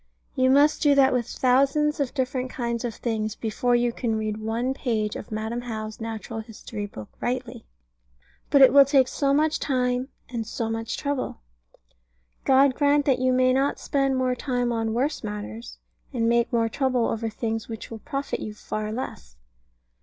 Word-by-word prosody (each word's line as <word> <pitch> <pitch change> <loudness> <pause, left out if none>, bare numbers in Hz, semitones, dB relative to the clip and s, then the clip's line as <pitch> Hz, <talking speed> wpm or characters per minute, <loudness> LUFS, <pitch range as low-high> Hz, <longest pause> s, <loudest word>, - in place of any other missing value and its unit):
You 260 -1 +3
must 285 +3 +4
do 290 -2 +5
that 270 -1 +5
with 245 -2 0
thousands 275 +5 +2
of 280 -1 -2
different 255 -1 -1
kinds 235 -2 -3
of 235 -3 -3
things 220 -2 -2
before 240 +2 0
you 240 0 +1
can 230 -3 -1
read 215 -1 -2
one 225 +4 -1
page 220 -6 -1
of - - -8
Madam 220 +3 -3
How's 220 -3 -6
Natural 225 0 -5
History 220 -1 -7
Book 110 - -9
rightly. 245 -1 -3 0.8
But 280 -1 +7
it 265 - +7
will 280 0 +9
take 270 -2 +3
so 275 +1 0
much 305 +2 +2
time 250 -1 0 0.2
and 230 -3 -4
so 225 0 -3
much 225 0 -3
trouble. 285 - -3 1.0
God 270 0 +5
grant 290 +1 +3
that 265 -3 +2
you 255 0 +2
may 255 0 +3
not 275 +2 +1
spend 275 -2 0
more 255 -1 +1
time 245 -1 -1
on 225 -1 -1
worse 280 +4 -1
matters, 210 +2 -6 0.3
and 235 -4 0
take 235 0 +2
more 230 -2 +2
trouble 250 0 +1
over 225 0 -1
things 225 0 -3
which 225 0 -7
will 225 - -6
profit 280 +3 -4
you 210 - -6
far 215 0 -4
less. 70 - -6
245 Hz, 175 wpm, -25 LUFS, 225-265 Hz, 1.0 s, will